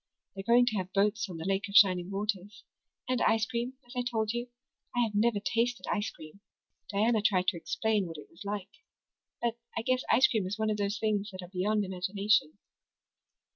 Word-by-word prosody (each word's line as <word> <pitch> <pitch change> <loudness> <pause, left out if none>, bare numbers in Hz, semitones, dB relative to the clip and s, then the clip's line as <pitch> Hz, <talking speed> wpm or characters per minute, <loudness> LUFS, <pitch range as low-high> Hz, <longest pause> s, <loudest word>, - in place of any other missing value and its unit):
They're 195 - -6
going 240 +4 +5
to 220 -3 0
have 185 -1 -3
boats 210 +1 +1
on 175 - -6
the 160 - -6
Lake 195 +1 0
of 200 - -8
Shining 185 -3 +6
Waters 205 +1 -3 0.4
and 255 -1 0
ice 225 0 +3
cream, 240 +2 -3
as 245 - -13
I 250 - +1
told 225 -3 -1
you. 240 +1 -3 0.5
I 245 - +3
have 230 -3 +1
never 210 +1 +2
tasted 230 +3 0
ice 205 +1 -1
cream. 155 +4 -13 0.5
Diana 220 +2 +2
tried 190 -3 +3
to 180 - -4
explain 210 +2 0
what 165 -1 -8
it 150 - -11
was 165 - -19
like, 200 -1 -4 0.7
but 235 0 -1 0.2
I 230 - -1
guess 255 +1 +1
ice 255 - +6
cream 215 -5 +1
is 200 +3 -3
one 220 0 0
of 210 - -1
those 205 +1 -1
things 215 -2 0
that 185 -2 -8
are 175 - -10
beyond 205 +3 0
imagination." 190 -1 +1
210 Hz, 205 wpm, -30 LUFS, 195-225 Hz, 0.7 s, Shining